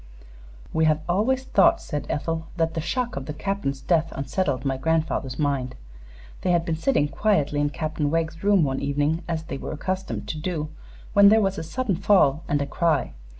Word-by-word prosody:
"We 160 Hz, 0 st, +3 dB
have 155 Hz, 0 st, +2 dB
always 225 Hz, +9 st, +1 dB
thought," 205 Hz, -6 st, +4 dB
said 150 Hz, -3 st, -5 dB
Ethel, 160 Hz, +2 st, -2 dB
"that 165 Hz, -1 st, +1 dB
the 160 Hz, -, -2 dB
shock 240 Hz, +9 st, -2 dB
of 135 Hz, -1 st, -5 dB
the 150 Hz, -, -5 dB
Captain's 155 Hz, -6 st, -2 dB
death 165 Hz, -3 st, +1 dB
unsettled 140 Hz, 0 st, -1 dB
my 135 Hz, -1 st, +1 dB
grandfather's 155 Hz, -2 st, -1 dB
mind. 140 Hz, -4 st, -1 dB, 0.7 s
They -, -, -1 dB
had 170 Hz, -1 st, +2 dB
been 165 Hz, -, -1 dB
sitting 160 Hz, -, +1 dB
quietly 150 Hz, -3 st, +1 dB
in 145 Hz, 0 st, +2 dB
Captain 150 Hz, +1 st, -2 dB
Wegg's 165 Hz, +1 st, -2 dB
room 200 Hz, -4 st, +4 dB
one 135 Hz, -2 st, 0 dB
evening, 145 Hz, +3 st, 0 dB
as 165 Hz, -2 st, -2 dB
they 135 Hz, -4 st, -6 dB
were -, -, -5 dB
accustomed 185 Hz, +5 st, -3 dB
to 155 Hz, -, -3 dB
do, 155 Hz, -2 st, -3 dB, 0.4 s
when 200 Hz, 0 st, +8 dB
there 220 Hz, +2 st, +6 dB
was 195 Hz, -3 st, 0 dB
a -, -, -4 dB
sudden 205 Hz, +2 st, -2 dB
fall 175 Hz, -7 st, +3 dB
and 145 Hz, -, +1 dB
a -, -, -2 dB
cry. 165 Hz, +3 st, 0 dB
160 Hz, 195 wpm, -24 LUFS, 145-185 Hz, 0.7 s, when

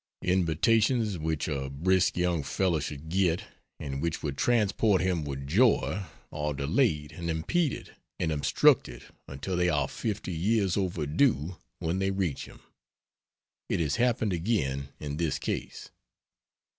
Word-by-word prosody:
Invitations 105 Hz, -, +2 dB
which 80 Hz, -1 st, -1 dB
a 70 Hz, -4 st, -2 dB
brisk 90 Hz, +8 st, +2 dB
young 90 Hz, -2 st, +1 dB
fellow 85 Hz, +4 st, 0 dB
should 75 Hz, +1 st, -6 dB
get, 90 Hz, -1 st, +1 dB, 0.4 s
and 70 Hz, -1 st, -4 dB
which 85 Hz, -1 st, -2 dB
would 70 Hz, -3 st, -2 dB
transport 105 Hz, -1 st, +2 dB
him 90 Hz, -3 st, 0 dB
with 70 Hz, -1 st, -5 dB
joy, 100 Hz, -, +2 dB, 0.3 s
are 75 Hz, 0 st, -2 dB
delayed 75 Hz, -, +1 dB
and 85 Hz, -2 st, -5 dB
impeded 135 Hz, -, -1 dB, 0.3 s
and 85 Hz, -3 st, 0 dB
obstructed 70 Hz, -4 st, +3 dB, 0.2 s
until 70 Hz, +7 st, -4 dB
they 90 Hz, 0 st, +2 dB
are 75 Hz, -5 st, +1 dB
fifty 100 Hz, -2 st, -4 dB
years 95 Hz, +2 st, +1 dB
overdue 90 Hz, -, +1 dB, 0.2 s
when 85 Hz, +2 st, -2 dB
they 95 Hz, 0 st, +1 dB
reach 95 Hz, -7 st, -2 dB
him. -, -, -15 dB, 1.1 s
It -, -, 0 dB
has 75 Hz, -4 st, 0 dB
happened 115 Hz, -4 st, +1 dB
again 75 Hz, -8 st, -1 dB
in 75 Hz, -1 st, -5 dB
this 80 Hz, -5 st, 0 dB
case. -, -, -5 dB
85 Hz, 135 wpm, -28 LUFS, 75-95 Hz, 1.1 s, obstructed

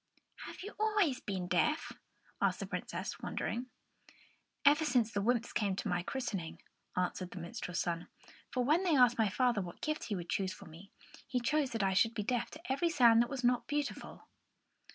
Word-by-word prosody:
"Have -, -, -8 dB
you 415 Hz, -, -7 dB
always 415 Hz, -11 st, +2 dB
been 190 Hz, -3 st, -3 dB
deaf?" 240 Hz, -, +1 dB, 0.5 s
asked -, -, +2 dB
the -, -, -3 dB
Princess, -, -, -4 dB
wonderingly. 245 Hz, +2 st, -3 dB, 1.0 s
"Ever 295 Hz, +2 st, +6 dB
since 245 Hz, -6 st, +2 dB
the 205 Hz, -, 0 dB
wymps 235 Hz, +2 st, +1 dB
came 200 Hz, -4 st, +1 dB
to -, -, -3 dB
my 175 Hz, 0 st, 0 dB
christening," 195 Hz, -6 st, -4 dB, 0.4 s
answered 180 Hz, 0 st, -1 dB
the -, -, -10 dB
minstrel's 175 Hz, +1 st, -4 dB
son. 170 Hz, -1 st, -2 dB, 0.4 s
"For 250 Hz, -, 0 dB
when 305 Hz, +8 st, +3 dB
they 355 Hz, -5 st, +2 dB
asked 245 Hz, -3 st, +5 dB
my 220 Hz, -2 st, +4 dB
father 240 Hz, +1 st, +2 dB
what 175 Hz, -2 st, -8 dB
gift 305 Hz, 0 st, -2 dB
he 210 Hz, -, -2 dB
would 175 Hz, -2 st, -5 dB
choose 190 Hz, -1 st, 0 dB
for -, -, -12 dB
me, 165 Hz, +5 st, -13 dB, 0.4 s
he 250 Hz, -, 0 dB
chose 275 Hz, +3 st, +1 dB
that 225 Hz, -3 st, 0 dB
I 190 Hz, -1 st, +2 dB
should 225 Hz, +4 st, +3 dB
be 210 Hz, -, -1 dB
deaf 240 Hz, +2 st, -1 dB
to 315 Hz, -2 st, -7 dB
every 335 Hz, +6 st, +2 dB
sound 240 Hz, -7 st, +6 dB
that 240 Hz, -, 0 dB
was 270 Hz, -2 st, -4 dB
not 245 Hz, 0 st, +2 dB
beautiful." 290 Hz, -1 st, -4 dB
235 Hz, 195 wpm, -34 LUFS, 190-280 Hz, 1.0 s, Ever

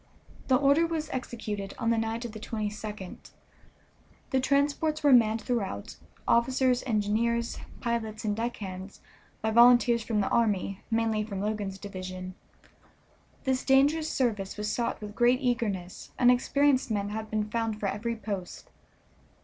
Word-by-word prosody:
The 260 Hz, -, +4 dB
order 285 Hz, +5 st, +4 dB
was 315 Hz, -2 st, -3 dB
executed 210 Hz, -6 st, -5 dB
on 230 Hz, -2 st, 0 dB
the 230 Hz, -, +2 dB
night 225 Hz, +2 st, -2 dB
of 235 Hz, -, -5 dB
the 215 Hz, -, -8 dB
22d. 210 Hz, -3 st, -5 dB, 1.1 s
The 265 Hz, -, +3 dB
transports 285 Hz, +3 st, +1 dB
were 285 Hz, -2 st, +6 dB
manned 225 Hz, -2 st, +4 dB
throughout, 230 Hz, -6 st, -3 dB, 0.3 s
officers, 255 Hz, +1 st, +3 dB
engineers, 230 Hz, +2 st, 0 dB, 0.2 s
pilots, 220 Hz, -2 st, -2 dB
and 210 Hz, -1 st, 0 dB
deck 235 Hz, +2 st, -2 dB
hands, 190 Hz, -1 st, -8 dB, 0.4 s
by 220 Hz, -, +1 dB
volunteers 240 Hz, 0 st, +6 dB
from 220 Hz, -1 st, -1 dB
the 200 Hz, -, +1 dB
army, 200 Hz, -4 st, +1 dB
mainly 225 Hz, -1 st, +1 dB
from 200 Hz, -3 st, -5 dB
Logan's 205 Hz, -1 st, -2 dB
division. 185 Hz, -2 st, -7 dB, 1.1 s
This 260 Hz, -2 st, 0 dB
dangerous 290 Hz, +4 st, +3 dB
service 210 Hz, -7 st, -1 dB
was 210 Hz, 0 st, -2 dB
sought 235 Hz, -, -1 dB
with 210 Hz, -1 st, -7 dB
great 240 Hz, +2 st, +3 dB
eagerness, 225 Hz, -9 st, -2 dB
and 245 Hz, 0 st, +6 dB
experienced 275 Hz, +2 st, +2 dB
men 205 Hz, -2 st, -1 dB
had 220 Hz, +1 st, -5 dB
been 215 Hz, -1 st, -1 dB
found 225 Hz, -1 st, -2 dB
for 210 Hz, -, -3 dB
every 230 Hz, +4 st, -2 dB
post. 200 Hz, -5 st, -6 dB
225 Hz, 145 wpm, -28 LUFS, 210-250 Hz, 1.1 s, were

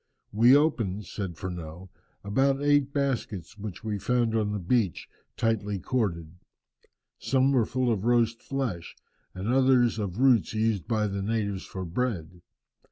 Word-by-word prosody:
"We 120 Hz, +5 st, +6 dB
opened," 110 Hz, -10 st, 0 dB
says 95 Hz, -1 st, -5 dB
Furneaux, 90 Hz, 0 st, -7 dB, 0.3 s
"about 135 Hz, +7 st, +1 dB
eight 145 Hz, -1 st, +2 dB
baskets 115 Hz, -, -3 dB
which 105 Hz, 0 st, -7 dB
we 105 Hz, -2 st, -3 dB
found 120 Hz, +1 st, +1 dB
on 105 Hz, -2 st, 0 dB
the 105 Hz, -, -2 dB
beach, 100 Hz, 0 st, 0 dB, 0.3 s
tightly 105 Hz, -3 st, 0 dB
corded. 90 Hz, -6 st, -2 dB, 0.8 s
Some 135 Hz, 0 st, +2 dB
were 120 Hz, -5 st, +2 dB
full 130 Hz, -1 st, 0 dB
of 105 Hz, -4 st, -1 dB
roast 115 Hz, -1 st, +2 dB
flesh, 125 Hz, -12 st, -4 dB, 0.4 s
and 95 Hz, +2 st, -5 dB
others 125 Hz, -2 st, +3 dB
of 100 Hz, -3 st, -3 dB
roots 125 Hz, -3 st, +3 dB
used 110 Hz, -4 st, 0 dB
by 110 Hz, -2 st, +1 dB
the 100 Hz, -1 st, -3 dB
natives 100 Hz, -2 st, -2 dB
for 95 Hz, -1 st, -6 dB
bread. 90 Hz, -4 st, -3 dB
110 Hz, 145 wpm, -27 LUFS, 95-125 Hz, 0.8 s, We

